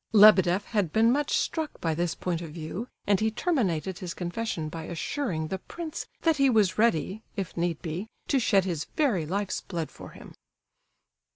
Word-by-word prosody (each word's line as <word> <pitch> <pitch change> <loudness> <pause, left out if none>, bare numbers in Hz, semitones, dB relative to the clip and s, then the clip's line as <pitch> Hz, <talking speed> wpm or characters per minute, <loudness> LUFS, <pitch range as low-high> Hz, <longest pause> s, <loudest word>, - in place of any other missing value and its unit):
Lebedeff 200 -3 +7
had 205 -8 0
been 225 +4 +4
much 290 +2 +1
struck 320 -2 -2
by 165 -1 0
this 170 +1 -1
point 175 -2 -2
of 165 - -6
view, 165 +9 -5 0.2
and 200 -2 +3
he 220 - +2
terminated 195 - 0
his 180 -4 -5
confession 175 -2 -3
by 160 +1 -6
assuring 170 - -2
the 190 - -3
prince 325 - -6 0.2
that 325 -2 +3
he 275 -1 +5
was 210 -5 +3
ready, 210 -2 +2
if 195 -5 -4
need 170 -2 -1
be, 175 +5 -4 0.2
to 275 - +3
shed 200 -5 +3
his 170 -5 -2
very 215 - +2
life's 195 +2 -1
blood 165 -4 -4
for - - -10
him. - - -13
190 Hz, 180 wpm, -28 LUFS, 170-225 Hz, 0.2 s, Lebedeff